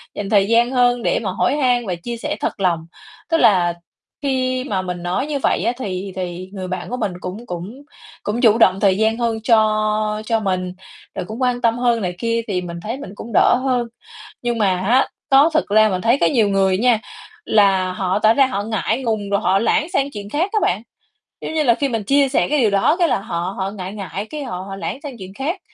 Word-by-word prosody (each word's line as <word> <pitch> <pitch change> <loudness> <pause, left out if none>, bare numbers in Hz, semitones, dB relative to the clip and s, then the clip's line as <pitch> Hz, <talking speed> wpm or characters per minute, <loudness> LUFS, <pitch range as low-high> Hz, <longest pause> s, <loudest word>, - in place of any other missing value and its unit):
dành 205 -1 -4
thời 200 -2 +4
gian 235 +3 +3
hơn 245 -2 +2
để - - +1
mà 190 - -1
hỏi 230 - +1
han 245 -4 +2
và 180 - -1
chia 235 +8 -6
sẻ 225 - -3
thật - - -3
lòng. 170 -4 0 0.4
Tức 330 - +3
là 180 - +4 0.5
khi 255 -2 0
mà 200 -8 -2
mình 180 -1 -5
nói 185 +11 -1
như 290 -2 -2
vậy - - +1
á, - - +3
thì 195 -4 -4
thì 180 0 -5
người 185 -2 -5
bạn 185 0 -5
của 250 - -3
mình 200 -6 -2
cũng 200 +6 -6
cũng 195 +9 -7 0.4
cũng 220 +4 -2
chủ 225 -3 +5
động 190 -4 +4
thời 195 -2 +3
gian 220 +1 +1
hơn 230 -2 -1
cho 215 -2 +2
cho 225 0 +1
mình, 185 -3 -2 0.4
rồi - - -3
cũng 220 +6 -7
quan 250 -1 +1
tâm 230 0 +2
hơn 240 -2 +2
này 180 -2 -3
kia 230 0 0
thì 185 -4 -1
mình 170 -1 -7
thấy 230 +4 -4
mình 270 - -8
cũng 230 - -9
đỡ - - +5
hơn. 250 -3 0 0.6
Nhưng 240 -1 -1
mà 190 -4 +1
á, 240 +8 +3 0.2
đó 280 +4 +6
thực 310 - +2
ra 215 +1 +5
mình 185 -2 -2
thấy 235 +4 +3
có - - +4
nhiều 225 -7 +3
người 195 -1 +2
á 195 - -4
nha, 245 -3 +4 0.5
là 195 -3 +3
họ 185 +1 -1
tỏ 220 +1 +4
ra 270 +1 +5
họ 230 -6 -2
ngại 220 +3 -1
ngùng 215 -4 -2
rồi 200 - +1
họ 195 -3 +2
lảng 285 +8 +1
sang 275 +1 +1
chuyện 205 -2 -7
khác 340 +7 0
á 430 - +2
bạn. 190 +5 +1 0.6
Giống - - -5
như 315 - +2
là 240 -5 +4
khi 280 +3 -1
mình 225 -4 -2
chia 275 +5 +3
sẻ 270 - +1
cái 300 -1 +2
điều 225 -4 +3
đó, 200 +11 +3
cái 340 - +4
là - - +1
họ 175 0 -4
họ 190 0 -2
ngại 190 -2 -7
ngại, 200 0 -5
cái 300 -2 -5
họ 235 -8 -5
họ 195 - -6
lảng 210 +6 -5
sang 275 -4 -6
chuyện 190 -1 -10
khác. 310 - -3
215 Hz, 240 wpm, -20 LUFS, 190-245 Hz, 0.6 s, đó